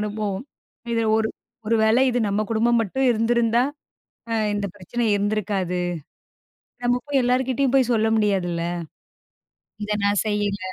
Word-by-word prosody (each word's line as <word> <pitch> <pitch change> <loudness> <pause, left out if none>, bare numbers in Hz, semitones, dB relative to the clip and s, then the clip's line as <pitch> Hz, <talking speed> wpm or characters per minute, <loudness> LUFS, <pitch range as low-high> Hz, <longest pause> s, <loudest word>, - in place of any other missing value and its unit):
அனுபவம். 210 -1 -3 0.5
இதில 230 -1 +1
ஒரு 220 0 +1 0.4
ஒரு 230 +1 +2
வேள 220 +2 +4
இது 245 -1 +1
நம்ம 200 +1 0
குடும்பம் 235 +1 +3
மட்டும் 260 +5 0
இருந்திருந்தா! 235 +1 +2 0.7
அ - - -1 0.2
இந்த 205 0 -1
பிரச்சனை 205 +5 -4
இருந்திருக்காது. 200 -3 -1 1.0
நம்ம 245 0 +2
போயி 280 -2 +2
எல்லார்கிட்டயும் 255 +1 +1
போய் 260 -3 +4
சொல்ல 220 -1 +2
முடியாதுல்ல! 190 -5 0 1.2
"இத 210 0 -2
நான் 205 0 +2
செய்யல. 205 -1 0
220 Hz, 130 wpm, -23 LUFS, 205-240 Hz, 1.2 s, வேள